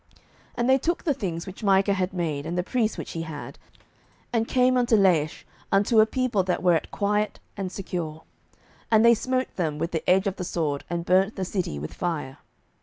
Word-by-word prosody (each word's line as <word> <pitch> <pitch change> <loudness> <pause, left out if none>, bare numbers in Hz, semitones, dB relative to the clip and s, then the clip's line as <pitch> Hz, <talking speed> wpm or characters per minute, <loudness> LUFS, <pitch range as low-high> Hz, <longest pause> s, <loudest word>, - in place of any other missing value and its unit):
07:018:027 - - -25 0.4
And 240 +1 0
they 265 - +6
took 340 +5 -1
the 300 - +2
things 170 -8 -4
which 190 +2 -10
Micah 195 0 +4
had 185 -1 -1
made, 160 -5 -2
and 175 +2 -3
the 180 - +1
priest 225 +1 0
which - - -6
he 165 - -4
had, 160 -3 -7 0.7
and 225 -1 +1
came 255 0 +3
unto 245 -2 +3
Laish, 170 -6 +2 0.3
unto 205 +3 +4
a 215 - +6
people 255 -4 0
that 180 -1 -1
were 180 -1 +5
at 160 - 0
quiet 210 +1 -1 0.2
and 195 -2 -4
secure: 170 -5 -5 0.7
and 220 0 +5
they 235 - +8
smote 255 +3 -1
them 155 -5 -1
with 165 +3 -2
the 160 - -2
edge 190 +2 +4
of 195 -1 -2
the 180 - -3
sword, 155 -5 -2
and 170 0 -3
burnt 190 +4 +3
the 190 - -2
city 180 - -3
with 75 +2 -6
fire. 150 -7 -3
190 Hz, 210 wpm, -25 LUFS, 170-220 Hz, 0.7 s, they